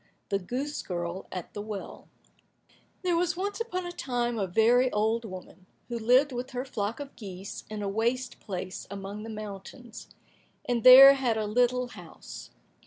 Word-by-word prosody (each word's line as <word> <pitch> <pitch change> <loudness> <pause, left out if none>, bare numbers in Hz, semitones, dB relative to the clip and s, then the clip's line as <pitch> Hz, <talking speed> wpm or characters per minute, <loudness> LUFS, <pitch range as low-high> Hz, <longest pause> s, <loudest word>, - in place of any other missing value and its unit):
179 200 - +2
The 180 - -14 0.2
Goose 295 - -5
Girl 175 0 -5
at 180 -2 -6
the 205 - -5
Well 210 -2 -8 0.9
There 355 -2 +2
was 350 +1 0
once 405 +4 -3
upon 370 -6 -3
a 350 - -5
time 240 -7 -2
a 195 - 0
very 240 +7 +4
old 220 +2 0
woman, 185 -1 -10 0.2
who 235 -1 -3
lived 250 +6 +4
with 250 +1 -4
her 250 +1 -3
flock 220 -3 -3
of 285 -1 -8
geese 195 -3 -8
in 210 -1 -5
a - - -2
waste 235 +5 -1
place 185 -1 -6
among 200 +1 -6
the 225 - -7
mountains, 215 +3 -9 0.6
and 240 -2 -1
there 265 +2 +11
had 255 -5 0
a 215 - -1
little 245 +3 +1
house. - - -11
230 Hz, 175 wpm, -28 LUFS, 200-255 Hz, 0.9 s, there